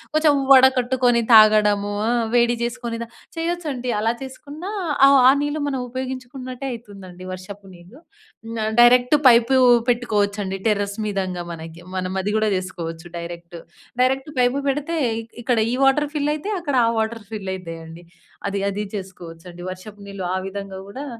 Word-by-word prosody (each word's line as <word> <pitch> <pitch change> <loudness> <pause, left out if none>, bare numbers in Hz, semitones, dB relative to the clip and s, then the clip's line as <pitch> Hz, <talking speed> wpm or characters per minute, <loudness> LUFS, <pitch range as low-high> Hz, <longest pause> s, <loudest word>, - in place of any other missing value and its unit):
కొంచెం 310 -2 +4 0.2
వడకట్టుకొని 255 -2 +5
తాగడము. 210 -1 +5 0.2
ఆ! - - +2 0.2
వేడి 240 0 +3
చేసుకొని 235 -1 -5
తా - - -22 0.3
చేయొచ్చండి 325 -7 -3
అలా 225 +2 +1
చేసుకున్నా 290 +8 -8 0.4
ఆ! - - +7 0.2
ఆ - - +8
నీళ్లు 290 +1 -2
మనం 270 - -2
ఉపయోగించుకున్నట్టే 255 0 -6
అయితుందండి, 205 -5 -10 0.3
వర్షపు 195 +2 -9
నీళ్లు. 180 +9 -16 0.6
న - - -3 0.2
డైరెక్ట్ 245 +2 +6
పైపు 240 +2 +5 0.3
పెట్టుకోవచ్చండి 205 -5 0
టెర్రస్ 205 -2 0
మీదంగా 185 -3 -3
మనకి, 165 0 -9
మనం 185 0 -2
అది 205 +2 -2
కూడా 215 0 +1
చేసుకోవచ్చు 170 -3 -5
డైరెక్ట్. 170 0 -8 0.5
డైరెక్ట్ 265 +3 +1
పైపు 245 +2 +2
పెడితే 295 +4 -1 0.5
ఇక్కడ 240 0 0
ఈ - - -1
వాటర్ 290 +2 +3
ఫిల్ 295 0 0
అయితయి, 400 +8 -3
అక్కడ 285 -5 -2
ఆ - - +2
వాటర్ 220 0 -2
ఫిల్ 195 -3 -4
అయితయండి. 165 -1 -9 0.4
అది, 200 0 -2
అది 205 +1 -3
చేసుకోవచ్చండి, 175 -2 -9
వర్షపు 205 +2 -11
నీళ్లు 195 -2 -6
ఆ - - 0
విధంగా 195 -1 -7
కూడా 270 +8 -7
225 Hz, 145 wpm, -21 LUFS, 190-260 Hz, 0.6 s, ఆ